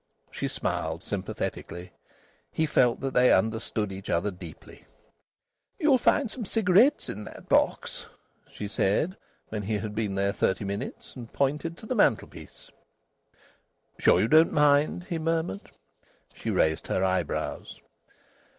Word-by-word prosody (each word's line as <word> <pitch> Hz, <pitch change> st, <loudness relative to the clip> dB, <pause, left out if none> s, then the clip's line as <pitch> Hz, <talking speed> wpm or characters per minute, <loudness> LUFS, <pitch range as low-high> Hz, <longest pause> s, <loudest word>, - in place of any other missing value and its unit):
She -, -, -3 dB
smiled -, -, -3 dB
sympathetically. 90 Hz, +1 st, -5 dB, 0.6 s
He 160 Hz, -, +1 dB
felt 125 Hz, -5 st, +2 dB
that 135 Hz, -1 st, -2 dB
they 125 Hz, 0 st, +5 dB
understood 110 Hz, -2 st, 0 dB
each 95 Hz, 0 st, -8 dB
other 85 Hz, +5 st, +1 dB
deeply. 90 Hz, -, -12 dB, 0.9 s
"You'll 295 Hz, -7 st, +4 dB
find 265 Hz, -1 st, +2 dB
some 250 Hz, -, -5 dB
cigarettes 220 Hz, +6 st, +3 dB
in 105 Hz, -, -5 dB
that -, -, -11 dB
box," -, -, +1 dB, 0.4 s
she 105 Hz, -, -6 dB
said, 110 Hz, -, 0 dB, 0.3 s
when 110 Hz, -1 st, -3 dB
he 105 Hz, +1 st, -1 dB
had 105 Hz, +1 st, -5 dB
been 105 Hz, -2 st, -2 dB
there 100 Hz, 0 st, +1 dB
thirty 95 Hz, +2 st, 0 dB
minutes, 100 Hz, +1 st, -6 dB
and 120 Hz, -3 st, -9 dB
pointed 150 Hz, +4 st, -1 dB
to -, -, -11 dB
the 235 Hz, -, -2 dB
mantelpiece. 200 Hz, -, -1 dB, 1.3 s
"Sure -, -, +5 dB
you 110 Hz, -, +2 dB
don't 155 Hz, +5 st, +6 dB
mind?" 150 Hz, +3 st, +3 dB
he 170 Hz, -2 st, -4 dB
murmured. 160 Hz, -, -2 dB, 0.6 s
She -, -, -5 dB
raised 80 Hz, 0 st, +1 dB
her 95 Hz, -, 0 dB
eyebrows. 95 Hz, -3 st, -2 dB
120 Hz, 135 wpm, -27 LUFS, 100-165 Hz, 1.3 s, don't